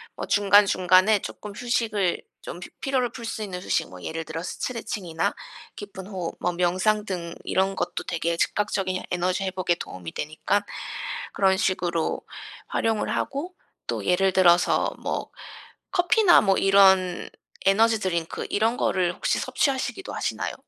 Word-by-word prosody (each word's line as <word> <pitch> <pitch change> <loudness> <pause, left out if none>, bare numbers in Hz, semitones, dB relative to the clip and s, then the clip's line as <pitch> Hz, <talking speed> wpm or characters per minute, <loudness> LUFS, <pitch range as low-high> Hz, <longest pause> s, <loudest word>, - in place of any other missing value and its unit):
뭐 - - -4
중간중간에 200 0 +5
쪼끔 210 - -8
휴식을 215 -5 0 0.2
좀 - - -7
피 180 - -9
피로를 260 -3 0
풀 235 -1 -8
수 225 0 -4
있는 185 -3 -5
휴식 - - -1
뭐 90 0 -11
예를 165 0 -4
들어 160 +1 -5
스트레칭이나 200 -6 -3 0.4
깊은 195 -2 -8
호흡, 185 -5 -5
뭐 175 - 0
명상 185 +5 +1
등 170 -4 -4
이런 190 +1 +1
것도 - - -3
되게 170 0 -2
즉각적인 190 -2 0
에너지 180 +2 0
회복에 185 -2 0
도움이 90 - -8
되니까는 155 +7 -1 0.7
그런 190 -1 +3
식으로 180 -4 0 0.5
활용을 225 -2 0
하고. 310 +7 -3 0.3
또 - - -2
예를 190 +1 +3
들어서 175 -2 +4
뭐 - - -3 0.6
커피나 355 +1 +5
뭐 195 -2 +3
이런 190 -2 +4 0.4
에너지 220 +3 +4
드링크 170 -4 -2
이런 225 +3 +1
거를 180 -2 +1
혹시 - - 0
섭취하시기도 275 +7 -1
하시나요? - - -2
190 Hz, 315 characters per minute, -25 LUFS, 180-215 Hz, 0.7 s, 중간중간에